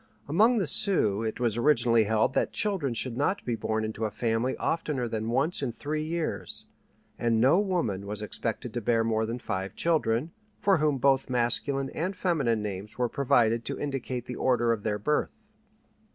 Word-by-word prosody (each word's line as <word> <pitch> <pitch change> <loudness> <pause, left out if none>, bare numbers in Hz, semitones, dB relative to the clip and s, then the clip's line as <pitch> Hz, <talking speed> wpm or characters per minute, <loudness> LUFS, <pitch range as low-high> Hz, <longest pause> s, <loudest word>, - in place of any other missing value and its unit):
Among 215 +11 +4
the 200 - +1
Sioux 140 - +5
it 110 +1 -3
was 120 -3 0
originally 120 -4 +3
held 110 +4 +1
that - - 0
children 180 - -1
should 120 +1 -2
not 145 +10 -1
be 120 - -1
born 110 -1 -2
into 110 +1 -3
a - - -1
family 115 +3 -1
oftener 150 -7 -2
than 110 0 -3
once 140 +9 +1
in 135 -4 -1
three 150 +6 -4
years, 165 +1 -3 0.5
and 115 -1 +1
no 135 - +5
woman 145 - -1
was 105 +1 -4
expected 115 +2 -4
to 120 - -3
bear 115 0 +2
more 110 -1 0
than 115 +2 -3
five 100 -5 -4
children, 155 -3 +1 0.3
for 195 -2 +3
whom 150 -2 +1
both 135 0 +2
masculine 130 +3 0
and 185 +5 -3
feminine 135 - 0
names 100 0 -6
were 125 -1 0
provided 120 -4 +2
to - - -3
indicate 130 -3 -4
the 125 - -6
order 120 -2 +2
of 115 -2 -1
their 105 -1 -1
birth. 150 +9 -1
120 Hz, 180 wpm, -27 LUFS, 115-150 Hz, 0.5 s, Sioux